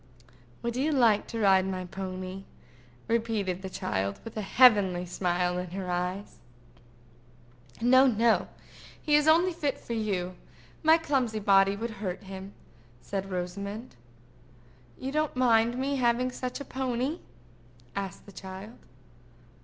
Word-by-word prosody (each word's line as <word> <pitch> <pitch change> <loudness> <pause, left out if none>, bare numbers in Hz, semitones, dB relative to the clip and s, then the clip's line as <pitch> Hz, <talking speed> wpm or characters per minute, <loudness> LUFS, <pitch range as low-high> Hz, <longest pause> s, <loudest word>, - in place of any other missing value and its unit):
"Would 235 0 -2
you 280 +5 +1
like 235 -7 +3
to 230 - -5
ride 190 -2 +4
my 185 -1 -3
pony?" 185 +1 -6 0.6
repeated 220 -5 -1
the 190 - -6
child, 100 - -2
with 225 - -9
a 215 - -2
heavenly 200 -5 +5
smile 180 0 -1
in 180 0 -5
her 185 0 -4
eyes. 180 +3 -3 1.4
"No, 260 +3 +6
no; 230 -1 +3 0.5
he 300 - -1
is 295 0 +4
fit 315 - +7
only 345 +3 +3
for 285 -6 -3
you. 190 -5 -2 0.5
My 320 +1 +6
clumsy 265 -8 0
body 195 -1 +4
would 230 +3 -4
hurt 185 -2 -4
him," 190 +1 -9 0.5
said 195 +7 -4
Rosamond. 200 - -5 1.0
"You 265 - -4
don't 305 0 0
mind 235 -1 +3
me 275 +2 -1
having 250 0 +2
such 250 +1 -5
a 280 - -6
pony?" 260 +5 -2 0.7
said 195 -1 -3
the 200 - -12
child. 190 +4 -9
210 Hz, 135 wpm, -28 LUFS, 190-250 Hz, 1.4 s, fit